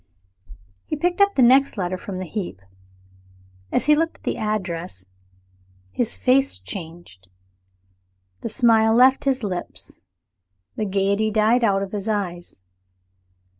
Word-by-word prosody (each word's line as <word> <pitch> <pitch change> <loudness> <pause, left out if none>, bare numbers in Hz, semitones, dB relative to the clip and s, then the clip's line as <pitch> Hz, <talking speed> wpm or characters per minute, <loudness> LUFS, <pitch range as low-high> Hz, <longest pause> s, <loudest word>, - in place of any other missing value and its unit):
He - - -2
picked 350 +5 0
up 400 0 +4
the 260 - +4
next 265 +1 +4
letter 185 -1 -2
from 185 +1 -7
the 185 - -4
heap. 175 - -5 1.1
As - - +1
he 300 +1 +5
looked 330 +2 -1
at - - -31
the - - -2
address, 180 - -4 0.9
his 235 -2 -2
face 270 +2 +2
changed. 165 - -10 1.1
The - - -4
smile 225 -1 +3
left 260 +3 +5
his 265 -3 0
lips, 180 -4 -6 0.8
the 215 - -2
gayety 200 +2 +1
died 220 +3 +2
out 195 -3 +2
of 195 - -7
his 205 0 -5
eyes. 175 - -4
215 Hz, 130 wpm, -22 LUFS, 185-250 Hz, 1.1 s, he